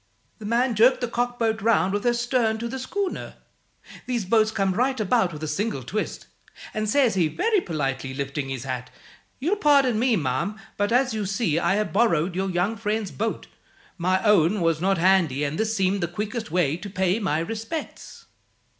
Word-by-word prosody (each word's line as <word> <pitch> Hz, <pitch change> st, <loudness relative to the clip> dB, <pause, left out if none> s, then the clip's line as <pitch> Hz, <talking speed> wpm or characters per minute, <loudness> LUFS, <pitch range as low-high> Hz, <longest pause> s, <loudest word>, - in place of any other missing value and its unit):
"The 215 Hz, -, -8 dB
man 240 Hz, +2 st, +2 dB
jerked 230 Hz, +5 st, +5 dB
the 245 Hz, -, 0 dB
cockboat 235 Hz, -2 st, -1 dB
round 200 Hz, -3 st, +2 dB
with 205 Hz, +3 st, -2 dB
her 240 Hz, -, +4 dB
stern 240 Hz, -2 st, +1 dB
to 235 Hz, +1 st, -4 dB
the 265 Hz, +3 st, -5 dB
schooner 385 Hz, +9 st, -4 dB, 0.7 s
these 240 Hz, -5 st, -1 dB
boats 220 Hz, +2 st, +3 dB
come 195 Hz, -3 st, 0 dB
right 255 Hz, +5 st, 0 dB
about 215 Hz, -2 st, +2 dB
with 155 Hz, -1 st, -8 dB
a -, -, -2 dB
single 155 Hz, -, -2 dB
twist 210 Hz, -, -4 dB, 0.5 s
and 215 Hz, 0 st, -2 dB
says 265 Hz, -2 st, +3 dB
he, 175 Hz, -4 st, +2 dB
very 420 Hz, -, +1 dB
politely 135 Hz, -, -3 dB
lifting 140 Hz, 0 st, -3 dB
his 130 Hz, -2 st, -4 dB
hat, 125 Hz, -1 st, -4 dB, 0.5 s
'You'll 340 Hz, +10 st, 0 dB
pardon 275 Hz, -, +4 dB
me, 245 Hz, -1 st, +3 dB
ma'am, 155 Hz, +7 st, -2 dB, 0.2 s
but 205 Hz, +1 st, 0 dB
(as 250 Hz, 0 st, +2 dB
you 210 Hz, -3 st, -2 dB
see) 190 Hz, -5 st, 0 dB
I 195 Hz, -, +2 dB
have 210 Hz, -5 st, -1 dB
borrowed 185 Hz, -6 st, +2 dB
your 190 Hz, +1 st, -1 dB
young 185 Hz, +5 st, 0 dB
friend's 210 Hz, -2 st, -2 dB
boat. 225 Hz, +2 st, -3 dB, 0.5 s
My 185 Hz, +2 st, +1 dB
own 210 Hz, -2 st, +4 dB
was 165 Hz, -1 st, +1 dB
not 195 Hz, +1 st, +2 dB
handy, 170 Hz, -6 st, +3 dB
and 145 Hz, +2 st, -2 dB
this 220 Hz, 0 st, 0 dB
seemed 195 Hz, 0 st, +1 dB
the 170 Hz, -, 0 dB
quickest 210 Hz, +5 st, -4 dB
way 160 Hz, -3 st, +1 dB
to 200 Hz, +3 st, -8 dB
pay 190 Hz, +1 st, 0 dB
my 190 Hz, -8 st, 0 dB
respects.' 225 Hz, -, -6 dB
205 Hz, 190 wpm, -24 LUFS, 170-230 Hz, 0.7 s, jerked